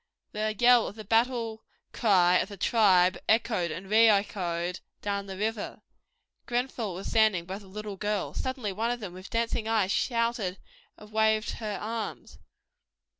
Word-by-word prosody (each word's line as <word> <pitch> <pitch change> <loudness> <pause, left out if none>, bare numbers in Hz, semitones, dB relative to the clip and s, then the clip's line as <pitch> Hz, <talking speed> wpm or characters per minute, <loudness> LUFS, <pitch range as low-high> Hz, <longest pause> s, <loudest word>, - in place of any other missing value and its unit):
The 215 0 -2
yell 245 0 +5
of - - -8
the 220 - -8
battle 225 0 0 0.3
cry 185 -5 +4
of 195 - -2
the 200 - -9
tribe 185 -4 +4
echoed 220 -6 +2
and 180 +5 -6
re 220 +2 +6
echoed 180 -4 0 0.2
down 200 -1 -2
the 190 -1 -7
river. 215 +1 -3 0.6
Grenfell 240 -5 -2
was 190 - -7
standing 215 -6 +2
by 190 +3 -6
the 200 - -15
little 205 +1 -7
girls. 210 -1 -2
Suddenly 260 -6 -3
one 225 +4 -1
of 245 0 -2
them 200 -6 -7
with 185 +1 -10
dancing 230 -1 -1
eyes 215 -4 +1
shouted 230 -6 0 0.4
and 210 0 -14
waved 220 0 +2
her 210 -3 -4
arms. 225 0 -5
215 Hz, 160 wpm, -28 LUFS, 190-225 Hz, 0.6 s, re